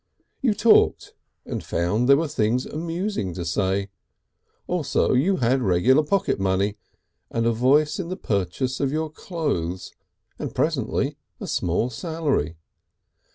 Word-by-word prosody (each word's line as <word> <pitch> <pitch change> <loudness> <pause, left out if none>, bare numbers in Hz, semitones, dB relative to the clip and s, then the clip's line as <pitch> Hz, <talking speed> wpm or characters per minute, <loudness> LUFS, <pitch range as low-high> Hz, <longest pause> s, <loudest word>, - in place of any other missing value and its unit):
You 235 -6 +2
talked, 230 - +4 0.3
and - - -4
found 105 +9 0
there 140 - +8
were 165 +2 0
things 125 -3 0
amusing 165 - -3
to 85 - -4
say. 95 +3 0 0.7
Also 175 -5 +1
you 160 +10 +3
had 130 -2 +1
regular 115 +8 +4
pocket 170 - 0
money, 95 +2 +1 0.5
and 115 0 -1
a 115 - +3
voice 140 - +3
in 175 -3 -4
the 185 - -4
purchase 125 - -2
of 140 -2 0
your 155 0 -2
clothes, 140 - -3 0.5
and - - -5
presently - - 0 0.2
a - - -5
small 90 +8 0
salary. 150 - -1
130 Hz, 135 wpm, -24 LUFS, 100-160 Hz, 0.7 s, there